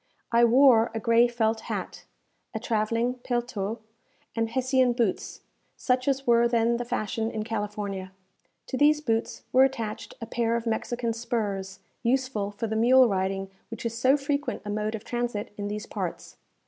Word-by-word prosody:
I 235 0 +5
wore 240 -1 +6
a - - 0
gray 230 +2 +4
felt 225 -2 0
hat, - - -5 0.5
a - - -1
travelling 230 +3 0
paletot, 235 -4 -2 0.6
and 225 -1 0
Hessian 260 0 +2
boots, 235 -6 -1 0.4
such 255 0 0
as 275 -1 +1
were 235 0 +5
then 235 0 +2
the 240 - -4
fashion 220 -1 -2
in 220 -2 -3
California. 205 -3 -4 0.5
To 260 - -4
these 300 +2 +5
boots 225 -6 -2
were 260 +1 +7
attached 230 -5 -2
a 230 - -5
pair 230 0 0
of 235 0 -2
Mexican 235 +1 -1
spurs, 205 -5 -3 0.2
useful 250 -4 0
for 205 +3 -4
the 220 0 -2
mule 250 +3 +6
riding 195 -1 -1 0.2
which 230 0 -7
is 230 0 -2
so 260 +4 +4
frequent 285 +1 -2
a 205 - -3
mode 215 +1 -1
of 215 - -7
transit 240 -4 -3
in 205 0 -4
these 210 +1 -4
parts. - - -5
230 Hz, 165 wpm, -27 LUFS, 215-245 Hz, 0.6 s, were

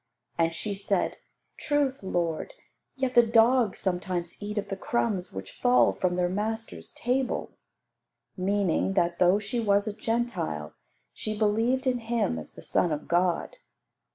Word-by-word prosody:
And 165 0 +2
she 185 +5 -3
said, 195 -1 -1 0.4
"Truth, 285 -3 0
Lord, 175 - -2 0.4
yet 265 -1 -1
the 240 - +8
dogs 230 -1 +4
sometimes 180 -2 -2
eat 210 +1 -5
of 205 -1 -2
the 195 - -2
crumbs 200 -2 -1
which 95 0 -7
fall 245 0 +4
from 180 -1 0
their 180 0 +2
masters' 220 +4 -3
table;" 255 +2 -1 0.8
meaning 195 -1 +1
that, 175 -2 +1
though 180 +2 +5
she 210 +3 -3
was 205 -2 +2
a 215 - -3
Gentile, 220 - -2 0.4
she 215 -1 -4
believed 225 +5 +1
in 255 -2 +1
Him 225 - -1
as 75 - -10
the - - -12
Son 175 - +1
of 150 0 -3
God. 175 0 +1
205 Hz, 150 wpm, -27 LUFS, 180-235 Hz, 0.8 s, the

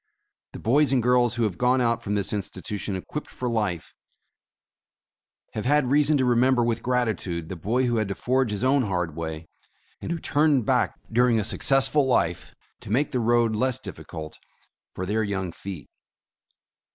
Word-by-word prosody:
The - - -8
boys 140 +6 +3
and 130 -3 +2
girls 125 -1 +3
who 120 - 0
have 105 -5 -2
gone 125 +1 +3
out 115 -2 +1
from 105 -2 -2
this 100 0 -1
institution 100 0 -4
equipped 145 +10 -6
for 125 - -5
life, 105 -8 -2 1.6
have 110 - -4
had 140 -1 +2
reason 150 +1 +4
to 130 - +1
remember 125 +1 +3
with 115 -1 -1
gratitude 110 -10 -1
the 95 - -5
boy 115 +10 0
who 120 -1 0
had 110 -2 0
to 100 - -4
forge 130 -1 0
his 105 +2 -3
own 135 +2 +3
hard 90 -8 -2
way, 80 -1 -5 0.5
and - - -5
who 170 - -1
turned 145 -5 +2
back - - +1 0.2
during 120 0 +3
a - - 0
successful 135 +6 +3
life, 85 -9 0 0.2
to - - -11
make 135 +7 +1
the 125 - 0
road 120 -1 +2
less 130 +2 +1
difficult 80 -1 -8 0.5
for 95 - -5
their 105 +4 0
young 95 -4 -2
feet. 90 -2 -8
115 Hz, 175 wpm, -25 LUFS, 100-130 Hz, 1.6 s, reason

